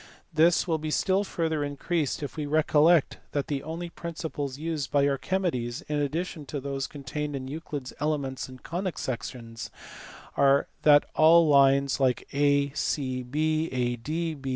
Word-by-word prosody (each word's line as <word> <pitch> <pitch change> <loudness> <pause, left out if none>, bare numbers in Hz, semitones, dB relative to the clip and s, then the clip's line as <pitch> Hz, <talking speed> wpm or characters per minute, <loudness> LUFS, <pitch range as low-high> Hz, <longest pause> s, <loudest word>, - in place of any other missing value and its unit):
This 165 +3 +4
will 160 -2 +1
be 155 0 -4
still 190 +5 +2
further 160 -6 -1
increased 145 +1 -2
if 145 - -5
we 150 -2 -3
recollect 155 +1 +3
that 145 -1 0
the 140 -2 -2
only 165 +3 -6
principles 155 -6 -5
used 155 -4 -3
by 140 -1 +3
Archimedes, 135 -5 -1
in 150 - -2
addition 155 0 -3
to 145 - -4
those 135 0 -3
contained 145 +1 -5
in 130 -1 -5
Euclid 145 -1 -5
s - - -8
Elements 140 -4 -2
and 130 -1 -13
Conic 180 +1 -3
sections, 115 -2 -5 0.7
are 140 0 +4
that 145 -1 +6
of - - -27
all 165 +1 +6
lines 140 -1 +4
like 130 -2 +1
AGE, 140 0 +3
ADB 145 +1 -1
145 Hz, 150 wpm, -27 LUFS, 135-160 Hz, 0.7 s, that